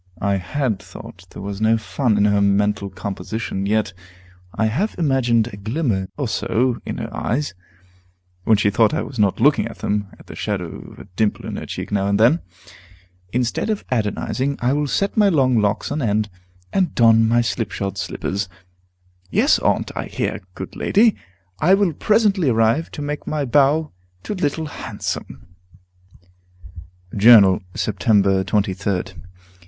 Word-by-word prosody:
I 100 -1 +1
had 110 +3 -2
thought 90 -1 -12
there - - -9
was 100 0 -5
no 110 +1 +4
fun 115 -1 0
in 100 - +3
her 100 -1 +3
mental 100 0 +1
composition. 100 0 -4
Yet 105 -2 0 0.6
I 110 - -1
have 155 - -1
imagined 125 -7 +2
a - - -7
glimmer 110 -3 -1
or 140 -3 -1
so 120 +2 0
in - - -4
her - - -6
eyes, 140 +1 -2 0.9
when 110 +1 +4
she 100 +1 +2
thought 110 +7 +3
I - - -1
was 130 - -8
not 100 -2 +2
looking - - +3
at - - -10
them, 105 -1 -2
and - - -17
the - - -10
shadow 95 -6 -4
of - - -15
a - - -10
dimple 105 +1 0
in - - -5
her - - -7
cheek - - -6
now 100 -1 +1
and 100 +1 +1
then. 125 +10 +5 0.9
Instead 125 - -1
of 215 -2 -2
Adonizing, 130 +4 -1
I 125 +2 +1
will 145 0 0
set 195 +8 -1
my 205 -2 +5
long 130 -8 +3
locks 105 +4 0
on 150 +1 -2
end, 105 -3 0 0.4
and 185 -6 +1
don 115 -1 +5
my 120 +1 +3
slipshod 100 -4 -3
slippers. 100 +1 -3 0.8
"Yes, - - +3
Aunt; - - 0
I - - -3
hear, - - -3
good 95 - -7
lady! 220 +1 +3 0.4
I 185 +5 +5
will 195 -4 +1
presently 205 - +2
arrive, 115 +7 +2
to 150 - -5
make 145 0 -5
my 150 -2 -1
bow 145 +4 +2 0.3
to - - -4
Little 160 -4 -1
Handsome." 130 -7 -6 1.7
Journal, 100 -3 +7
Sept. 105 -3 -2
23d. 100 -1 +1
110 Hz, 160 wpm, -21 LUFS, 100-145 Hz, 1.7 s, Journal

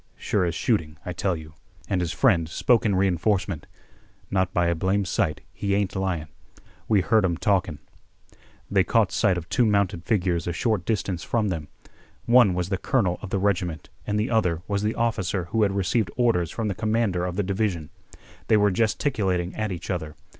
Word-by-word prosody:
"Sure 100 -3 0
as 85 -1 -2
shooting, 80 -10 0
I 90 - -4
tell 90 +1 0
you." 80 -1 -10 0.3
And 95 -3 0
his 85 -2 -1
friend 90 -11 +2
spoke 115 +6 +2
in 100 - +1
re 95 +1 +3
enforcement. 90 -2 -1 0.6
"Not 95 -2 +1
by 90 -1 +1
a 85 - +2
blame 95 +4 0
sight, 80 -3 -1
he 100 -1 -1
ain't 100 -1 -1
lyin'. 95 -5 -2 0.6
We 105 -3 +4
heard 110 +2 +3
'em 85 -3 0
talkin'." 90 -6 +1 0.9
They 95 -2 +3
caught 105 +3 +2
sight 95 -5 +2
of 85 -1 -5
two 125 - +2
mounted 100 -6 +1
figures 90 -3 0
a 85 - -1
short 110 -2 0
distance 95 -5 -1
from 110 -3 0
them. 80 -5 -4 0.6
One 120 -6 +5
was 90 0 -2
the 95 -2 -1
colonel 95 -9 0
of 100 - -7
the 100 - 0
regiment 90 -8 -1 0.2
and 105 0 0
the 110 - -1
other 90 -7 +1
was 100 -1 -1
the 105 +1 -1
officer 100 -5 0
who 110 0 +1
had 100 -2 +2
received 100 +1 +1
orders 115 -10 +2
from 115 -2 -3
the 100 - -1
commander 110 -3 0
of 90 -1 -3
the 105 - 0
division. 95 -5 -2 0.6
They 110 - +5
were 105 -1 +3
gesticulating 95 -4 0
at 110 -2 -2
each 90 +1 -5
other. 80 -4 -4
95 Hz, 195 wpm, -25 LUFS, 90-105 Hz, 0.9 s, One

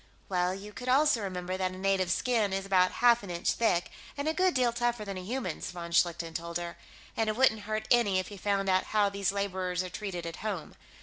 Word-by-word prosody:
"Well, 180 -1 +1
you 205 +2 -9
could 255 +2 -5
also 275 -2 +4
remember 185 -1 -3
that 185 -1 -1
a - - -8
native's 190 -2 +1
skin 225 -6 +1
is 195 0 -2
about 185 -2 +3
half 240 -1 +7
an 200 - -9
inch 170 -1 0
thick, 180 -7 +1 0.3
and 285 +2 -2
a 315 - +2
good 370 +1 +2
deal 245 -2 +2
tougher 240 -2 -1
than 195 -1 -5
a 185 - -5
human's," 210 -4 -3
von 170 -1 -7
Schlichten 170 -1 +1
told 170 +1 -3
her. 175 0 -5 0.4
"And 225 -1 +1
it 215 - -1
wouldn't 220 -4 +3
hurt 215 0 -2
any 230 -6 +4
if 185 +2 -2
you 200 - -9
found 200 -1 0
out 185 0 +3
how 205 -1 +4
these 200 -1 0
laborers 185 -2 -1
are 180 - -7
treated 180 -3 -5
at 165 - -5
home. 200 -7 -4
195 Hz, 235 wpm, -30 LUFS, 180-220 Hz, 0.4 s, half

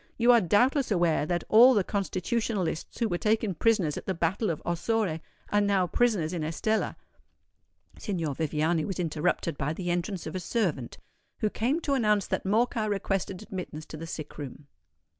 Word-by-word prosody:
You 240 +1 +5
are 235 -2 +6
doubtless 245 - +2
aware 170 -6 +2
that 175 -1 -1
all 245 +4 +7
the 205 - +3
Constitutionalists 195 -2 -2
who 230 - +1
were 175 -4 -2
taken 215 -2 +1
prisoners 185 -4 +1
at - - -8
the 190 - -1
battle 175 +6 0
of 160 - -2
Ossore, 175 0 0 0.3
are 205 - +3
now 200 -2 +2
prisoners 185 -4 +1
in 170 -3 -2
Estella——" 190 +8 -1 1.0
Signor 170 -8 -2
Viviani 160 +2 0
was 190 0 -4
interrupted 165 -1 -1
by 145 +3 -1
the 175 +1 -3
entrance 175 +1 -2
of 160 - -6
a - - -1
servant, 175 - -2 0.4
who 215 - +1
came 260 +8 0
to 285 - 0
announce 210 -6 +2
that - - -2
Morcar 220 +1 +1
requested 195 -1 -2
admittance 180 -6 -6
to - - -9
the 165 +2 -7
sick 155 -2 -7
room. 145 0 -8
190 Hz, 175 wpm, -28 LUFS, 165-220 Hz, 1.0 s, all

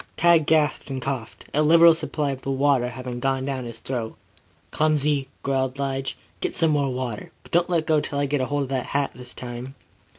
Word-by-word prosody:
Tad 170 -3 +4
gasped 150 -3 +2
and 135 -1 -3
coughed, 130 -4 -5
a 150 - +3
liberal 165 +2 +7
supply 155 -2 -2
of 135 -1 -6
the 135 - -5
water 135 -2 +2
having 125 0 -6
gone 135 0 0
down 135 -2 -3
hist 115 -1 -8
throat. 120 -4 -3 0.6
"Clumsy!" 150 -2 +1 0.2
growled 135 -1 0
Lige. 135 -1 -2 0.2
"Get - - -2
some 165 -2 +3
more, 130 -6 -2
but - - -17
don't 175 +1 +2
let 165 -3 +1
go 155 -2 +3
till 140 - -4
I 145 - +1
get 140 0 0
hold 145 +2 0
of 135 - -6
the 135 -2 0
hat 140 +2 -1
this 125 0 -8
time." 125 +2 -7
135 Hz, 200 wpm, -24 LUFS, 130-150 Hz, 0.6 s, liberal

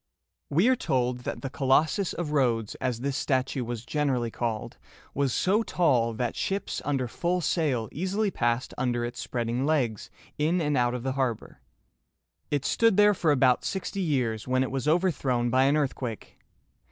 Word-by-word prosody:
We 170 +10 +3
are 260 - +5
told 125 - 0
that - - -4
the 135 - -3
Co 140 -2 -3
los´sus 155 +8 +3
of 170 -4 -3
Rhodes, 120 -7 +1
as 120 -2 -1
this 140 0 -1
statue 130 -2 0
was 120 -1 -5
generally 130 -6 0
called, 115 -2 -4 0.3
was 140 -2 0
so 200 - +2
tall 125 - +1
that 120 +1 -2
ships 195 +1 -2
under 135 -3 -1
full 175 +8 -1
sail 145 -8 0
easily 195 +5 -1
passed 120 -2 -1
under 120 -2 0
its 120 +1 -6
spreading 120 +1 -2
legs 135 -8 0 0.3
in 160 +4 +2
and 150 -3 0
out 120 -1 +2
of 125 - -5
the 135 - -1
harbor. 130 -4 -3 0.9
It 145 -2 -1
stood 230 -4 +3
there 210 0 +6
for 170 -5 +1
about 130 -3 +3
sixty 195 0 -3
years, 125 - -1
when 130 +1 +2
it 130 - -4
was 135 0 -2
overthrown 140 -8 +1
by 130 +1 +4
an 140 +2 +3
earthquake. 130 -6 -4
135 Hz, 175 wpm, -27 LUFS, 120-155 Hz, 0.9 s, there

